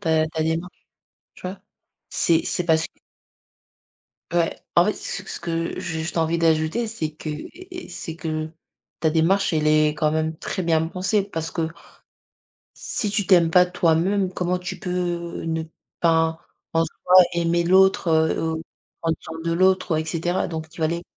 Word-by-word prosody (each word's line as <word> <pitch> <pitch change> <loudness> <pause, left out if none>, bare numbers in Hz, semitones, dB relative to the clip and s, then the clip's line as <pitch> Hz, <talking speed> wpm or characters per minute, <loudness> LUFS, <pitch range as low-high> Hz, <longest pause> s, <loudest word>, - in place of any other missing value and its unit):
ta 160 -4 +2
ta 160 0 -2
démarche, 165 +3 -3 0.5
tu - - -15
vois? 190 +2 -7 0.5
C'est 165 -1 +2
c'est 180 - 0
parce 160 -1 +3
que - - -30 1.4
Ouais, 170 -1 +1 0.2
en 175 - +7
fait 210 - +2
ce 195 -1 -5
c - - -5
que 165 -1 -2
j'ai 160 -2 -4
juste 160 - -4
envie 165 0 +1
d'ajouter 160 +7 +2
c'est 215 -9 -3
que 155 - -7
et 360 - -8
et - - -19
c'est 170 -2 -6
que, 155 -1 -3 0.5
ta 160 0 +2
démarche 170 +5 +2
elle 155 -1 +1
est 155 0 +5
quand 150 0 +1
même 160 0 -1
très 185 - -3
bien 160 -1 +2
pensée 190 +4 0
parce 165 -5 -4
que 165 -2 -1 1.1
si 210 - -2
tu 205 -2 0
t'aimes 175 -4 +5
pas 180 +1 +6
toi-même, 180 +2 +1
comment 180 0 -1
tu 180 0 -6
peux, 175 -2 -3
ne 160 0 -1
enfin, 160 - -12 0.3
pas 165 -1 +3 0.4
en 165 - +3
soi 180 +3 -1 0.2
aimer 170 0 +1
l'autre, 190 0 +4 0.3
ou 160 0 -2 0.4
prendre 165 -1 0
soin 160 0 -8
de 165 0 -1
l'autre 185 +1 +3
ouais, 155 - +1
et - - -9
cetera. 170 +3 -1
Donc 160 -1 -5
tu 165 +1 -13
vas 160 - +3
les. 170 +2 -2
165 Hz, 180 wpm, -23 LUFS, 160-180 Hz, 1.4 s, en